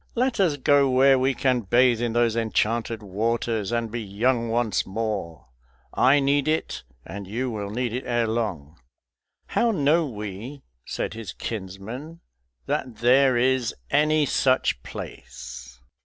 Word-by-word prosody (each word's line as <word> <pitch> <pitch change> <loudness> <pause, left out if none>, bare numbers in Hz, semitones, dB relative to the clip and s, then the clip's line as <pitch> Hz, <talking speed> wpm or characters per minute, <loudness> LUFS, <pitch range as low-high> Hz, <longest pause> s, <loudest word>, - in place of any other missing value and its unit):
Let 250 -1 0
us 170 -7 +2
go 140 0 +4
where 135 +1 +5
we 130 +1 +1
can 125 -1 +1
bathe 120 +3 +3
in 120 -2 -1
those 120 -1 +2
enchanted 115 0 0
waters 110 +1 -1
and 115 -2 -1
be 120 0 -3
young 115 +4 0
once 115 -3 +1
more. 95 - -4 0.5
I 135 +3 +4
need 140 +1 +1
it, 160 +1 -1 0.2
and 100 -1 -7
you 120 +5 -2
will 105 -2 -4
need 120 +2 -2
it 125 - -3
ere 120 -1 +1
long." 95 -10 -3 0.7
"How 235 - +2
know 160 -4 +2
we," 110 +4 -7 0.2
said - - -3
his 110 -5 -7
kinsman, 115 - -7 0.5
"that 125 -3 -2
there 130 +1 +4
is 130 -1 +1 0.2
any 155 0 +3
such 130 - +1
place?" 65 -1 -9
120 Hz, 140 wpm, -24 LUFS, 105-135 Hz, 0.7 s, where